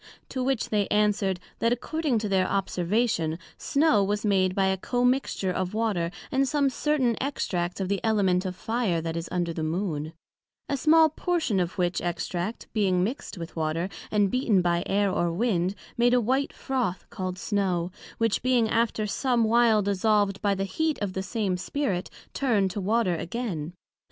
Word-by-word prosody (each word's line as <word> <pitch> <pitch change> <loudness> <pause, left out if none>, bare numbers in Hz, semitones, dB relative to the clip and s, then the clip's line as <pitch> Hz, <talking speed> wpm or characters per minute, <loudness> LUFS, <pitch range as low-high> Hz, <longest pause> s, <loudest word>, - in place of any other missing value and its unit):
To 260 -1 -2
which 265 -2 0
they 205 -2 +1
answered 205 -3 +1 0.2
That 230 - +2
according 290 +2 0
to 215 -1 -1
their 190 -2 +2
observation, 190 -2 0 0.2
Snow 280 -8 +3
was 205 +2 -1
made 185 -2 +2
by 195 - +2
a 190 0 +2
commixture 245 -3 0
of 185 +2 -2
Water, 210 -7 0 0.2
and 270 +1 +2
some 280 0 +2
certain 260 -4 +1
extract 180 -11 -2
of 190 - -1
the 200 0 -1
Element 195 -5 +2
of 185 -2 -4
Fire 220 -4 -1
that 165 0 -4
is 170 0 -4
under 175 -2 -1
the 160 - -4
Moon; 160 -2 -2 0.5
a 280 - 0
small 315 +3 +5
portion 315 - 0
of 175 0 -2
which 175 -1 0
extract, 175 +4 -3
being 190 -4 +2
mixed 230 0 -4
with 165 -1 -7
Water, 165 +3 -1 0.2
and 205 -2 +2
beaten 230 -8 +2
by 170 0 +2
Air 200 0 +2
or 175 -2 0
Wind, 185 -1 0 0.2
made 240 +1 +4
a - - +5
white 260 +5 0
Froth 250 -9 -2
called 185 -1 -4
Snow; 185 -3 -1 0.3
which 225 -2 +1
being 250 -3 +3
after 225 -1 +1
some 240 +2 +1
while 225 -1 +4
dissolved 200 0 +1
by 200 -1 +2
the 195 - -2
heat 310 +11 -1
of 200 -3 -2
the 190 - -2
same 195 -2 -1
spirit, 190 -1 -2 0.2
turned 215 -8 +1
to 205 - -4
Water 205 -2 +1
again. 175 -3 -4
200 Hz, 175 wpm, -26 LUFS, 180-240 Hz, 0.5 s, small